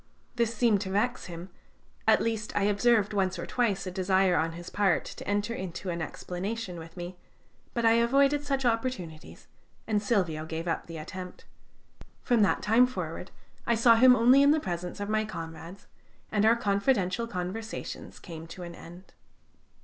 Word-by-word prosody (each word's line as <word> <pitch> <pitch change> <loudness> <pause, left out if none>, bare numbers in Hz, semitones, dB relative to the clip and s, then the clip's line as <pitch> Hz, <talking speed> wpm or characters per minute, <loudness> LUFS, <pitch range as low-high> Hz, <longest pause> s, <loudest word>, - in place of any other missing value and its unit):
This 235 -2 +1
seemed 215 -3 +3
to 190 - -4
vex 230 +6 0
him; 175 +1 -8 0.6
at - - +5
least 225 -2 -2
I 205 - +2
observed 210 +1 +3
once 190 -2 0
or 170 - -4
twice 230 -7 0
a 185 - -4
desire 185 0 +2
on 165 0 0
his 175 +1 -9
part 200 -3 +2
to - - -9
enter 205 +3 0
into 185 -2 -5
an 170 0 -3
explanation 185 +4 -5
with 165 +2 -12
me, 175 +1 -6 0.6
but 235 -1 0
I 225 - +6
avoided 275 +4 +3
such 275 -2 -1
opportunities, 225 -10 -3 0.4
and 210 -2 0
Silvio 185 -8 0
gave 165 +1 -4
up 165 - -2
the 165 -1 -7
attempt. 180 +3 -8 0.8
From 240 -3 +3
that 205 - +2
time 230 +4 +5
forward 255 - -5 0.4
I 235 - +3
saw 230 +1 +6
him 250 +2 +7
only 250 +4 +6
in 280 - +6
the 310 +2 +4
presence 180 - -5
of 205 - -3
my 215 +1 +1
comrades, 165 -1 -8 0.5
and 210 0 +3
our 230 - +6
confidential 205 0 +1
conversations 205 +2 -6
came 165 -2 -9
to 180 +2 -9
an 170 0 -7
end. 175 +3 -13
200 Hz, 170 wpm, -28 LUFS, 180-230 Hz, 0.8 s, him